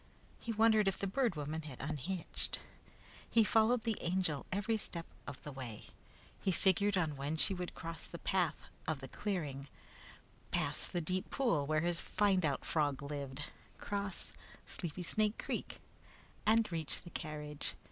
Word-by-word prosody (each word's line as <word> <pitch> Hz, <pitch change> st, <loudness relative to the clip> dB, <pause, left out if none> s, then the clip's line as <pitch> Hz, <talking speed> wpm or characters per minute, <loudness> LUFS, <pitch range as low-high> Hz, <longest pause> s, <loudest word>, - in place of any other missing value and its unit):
He 230 Hz, -, -3 dB
wondered 220 Hz, -1 st, +5 dB
if 195 Hz, -, +2 dB
the -, -, -2 dB
Bird 225 Hz, +1 st, +1 dB
Woman 150 Hz, +2 st, -2 dB
had 150 Hz, -5 st, -8 dB
unhitched. 155 Hz, +5 st, -1 dB, 0.7 s
He 230 Hz, -, +6 dB
followed 225 Hz, +2 st, +4 dB
the 225 Hz, -2 st, 0 dB
Angel 170 Hz, -5 st, +1 dB
every 205 Hz, +4 st, +1 dB
step 170 Hz, -5 st, +2 dB, 0.2 s
of 135 Hz, -, -6 dB
the 150 Hz, -, -5 dB
way. 125 Hz, -5 st, -7 dB, 0.5 s
He 190 Hz, -, +1 dB
figured 195 Hz, +2 st, +3 dB
on 160 Hz, -5 st, +1 dB
when 145 Hz, +3 st, -1 dB
she 195 Hz, -, +6 dB
would 180 Hz, -1 st, -4 dB
cross 165 Hz, -1 st, -4 dB
the 170 Hz, -, -7 dB
path 175 Hz, -4 st, +1 dB, 0.2 s
of 155 Hz, -3 st, 0 dB
the 135 Hz, -, -6 dB
clearing, 145 Hz, -6 st, -3 dB, 0.8 s
pass -, -, +2 dB
the 175 Hz, -, -1 dB
deep 185 Hz, +5 st, -1 dB
pool 170 Hz, -, +2 dB
where 155 Hz, 0 st, +3 dB
his 170 Hz, 0 st, 0 dB
"find 195 Hz, -3 st, +2 dB
out" 145 Hz, -3 st, 0 dB
frog 145 Hz, -3 st, +1 dB
lived, 140 Hz, -1 st, -4 dB, 0.3 s
cross 200 Hz, -2 st, -3 dB, 0.3 s
Sleepy 175 Hz, 0 st, -4 dB
Snake 215 Hz, +4 st, +2 dB
Creek, -, -, -3 dB, 0.7 s
and 225 Hz, -1 st, +5 dB
reach 160 Hz, -3 st, -2 dB
the 175 Hz, -, -10 dB
carriage. 150 Hz, -2 st, -4 dB
170 Hz, 155 wpm, -36 LUFS, 150-200 Hz, 0.8 s, He